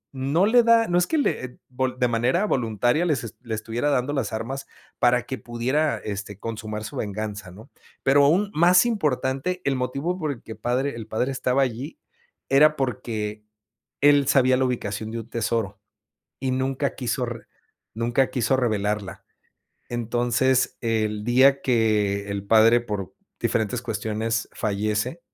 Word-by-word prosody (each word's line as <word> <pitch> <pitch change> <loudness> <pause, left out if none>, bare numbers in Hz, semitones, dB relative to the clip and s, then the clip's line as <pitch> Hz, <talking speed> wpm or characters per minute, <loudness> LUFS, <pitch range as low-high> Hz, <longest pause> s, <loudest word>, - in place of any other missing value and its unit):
no 140 +8 +1
le 240 +3 +5
da, 230 0 +5
no 175 0 +2
es 180 - +1
que 320 - 0
le, 285 - 0
eh 125 - -11
vol 130 0 -2
de 125 - +3
manera 120 - +1
voluntaria 120 - +1
les 150 -9 0
eh, - - -5
le 115 - -6
estuviera 115 +6 -2
dando 135 0 0
las 135 -7 -2
armas 130 +5 -4 0.3
para 125 0 +3
que 130 +1 -5
pudiera 130 +6 -1
este 100 -1 -6
consumar 110 -1 -5
su - - -8
venganza, 105 -1 -4
¿no? 105 +5 -14 0.3
Pero, 140 +1 +5
aún 190 +8 +2
más 175 +6 +5
importante 155 - -1
el 140 - +1
motivo 135 +8 -2
por 155 -5 -2
el 125 - -8
que 110 - -8
padre 125 +2 -1
el 115 -2 -7
padre 115 +5 -1
estaba 130 0 +1
allí, 130 - -5 0.5
era 150 +3 +5
porque, 110 -6 -3 0.6
él 145 -1 +5
sabía 130 -2 +4
la 130 - +2
ubicación 110 -3 -3
de 115 - -4
un 110 - -15
tesoro 110 -4 -2 0.6
y 130 0 -1
nunca 135 +2 -1
quiso 125 0 -1
re 115 -1 -7 0.5
nunca 120 +3 +1
quiso 130 +1 +1
revelarla. 105 -5 -2 0.7
Entonces, 120 +2 +1
el 110 -2 -1
día 135 +4 +4
que 105 -4 +1
el 100 -1 -3
padre, 115 +3 +5
por 105 -5 -5 0.3
diferentes 115 +2 0
cuestiones, 110 0 -2
fallece, 105 +7 -1
120 Hz, 160 wpm, -24 LUFS, 110-135 Hz, 0.7 s, le